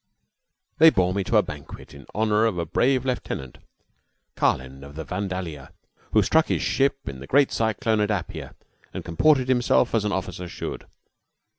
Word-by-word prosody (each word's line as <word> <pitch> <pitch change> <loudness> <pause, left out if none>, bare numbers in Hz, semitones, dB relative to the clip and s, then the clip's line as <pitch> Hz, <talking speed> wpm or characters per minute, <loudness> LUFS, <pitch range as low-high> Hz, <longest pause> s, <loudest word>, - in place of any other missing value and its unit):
They 160 +1 +9
bore 90 - +1
me 100 0 -1
to - - +2
a - - +5
banquet - - -10
in 70 -2 -13
honor 110 0 +2
of 100 -5 -2
a 85 - -1
brave 130 - +1
lieutenant 95 - -4 0.8
Carlin, 65 +1 -1
of 70 +1 -11
the 80 - -5
"Vandalia" 90 -5 -5 0.4
who 110 - +5
stuck 160 +10 +3
by - - +1
his - - -2
ship 135 0 0
in 65 -1 -6
the 70 - -10
great 140 0 +4
cyclone 110 0 0
at 105 0 +1
Apia 100 -5 -4 0.4
and - - -5
comported 130 - +3
himself 125 -1 +2
as 115 -3 +2
an 105 - -1
officer 90 -2 -4
should. - - -6
100 Hz, 175 wpm, -24 LUFS, 85-125 Hz, 0.8 s, They